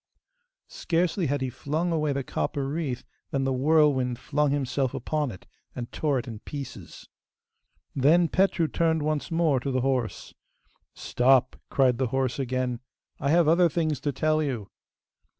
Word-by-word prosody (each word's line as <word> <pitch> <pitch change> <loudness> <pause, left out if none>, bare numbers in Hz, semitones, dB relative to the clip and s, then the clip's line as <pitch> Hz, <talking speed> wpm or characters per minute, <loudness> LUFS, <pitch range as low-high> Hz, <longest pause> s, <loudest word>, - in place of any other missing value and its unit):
Scarcely 175 0 0
had 140 0 -1
he 130 -1 -2
flung 160 +7 -2
away 155 -2 +1
the 140 0 -2
copper 135 +2 -2
wreath 140 -4 -3 0.3
than 135 -1 -1
the 135 0 0
whirlwind 135 -3 +3
flung 150 +3 0
himself 135 -2 -1
upon 150 +3 -1
it, 95 -6 -10 0.3
and 120 -1 -6
tore 145 -3 0
it 125 +1 -4
in 115 -3 -7
pieces. 140 +2 -9 0.9
Then 160 +6 +4
Petru 185 -2 +2
turned 160 -1 +1
once 155 -1 -1
more 165 -5 +2
to 135 - -4
the 130 -1 0
horse. 130 -3 -2 0.6
'Stop!' 130 0 +2
cried 130 -3 +2
the 130 - +1
horse 130 +1 -1
again. 130 -2 -1 0.4
'I 140 - -1
have 165 +1 +4
other 170 +2 +5
things 155 -3 -1
to 145 - -1
tell 155 +2 +1
you. 125 -9 -3
140 Hz, 155 wpm, -26 LUFS, 130-155 Hz, 0.9 s, other